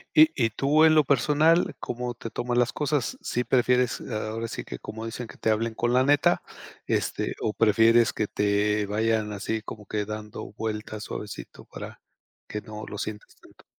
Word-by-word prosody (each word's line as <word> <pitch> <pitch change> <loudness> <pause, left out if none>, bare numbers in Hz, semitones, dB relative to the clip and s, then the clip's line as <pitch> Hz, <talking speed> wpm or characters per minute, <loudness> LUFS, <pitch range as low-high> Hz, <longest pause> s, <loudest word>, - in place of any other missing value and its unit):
Y 155 +1 +8
y 115 -3 +1
tú 145 +7 +3
en 160 - +6
lo 155 -1 +6
personal, 150 +5 +3
¿cómo 125 0 -4
te 115 -1 -7
tomas 120 +2 -2
las 120 -1 +3
cosas? 150 -3 -1
¿Sí 125 - -1
prefieres 125 -1 +2
ahora 110 0 -4
sí - - -5
que - - -7
como 110 - -7
dicen 120 +2 -5
que - - -13
te 110 - 0
hablen 110 +1 +1
con 120 +1 0
la 125 +1 +4
neta, 145 +1 +3 0.4
este, - - -1
o 110 - 0
prefieres 115 +2 +4
que 105 - -1
te 105 +1 +1
vayan 110 +1 0
así 110 +2 -3
como 105 -2 -9
que 105 -1 -2
dando 105 -1 -7
vueltas 110 -1 -4
suavecito 105 -1 -8
para - - -9 0.5
que 105 - -5
no 110 -1 -8
lo 105 - -6
sientas 105 -1 -6
tanto? - - -20
115 Hz, 185 wpm, -26 LUFS, 105-125 Hz, 0.5 s, Y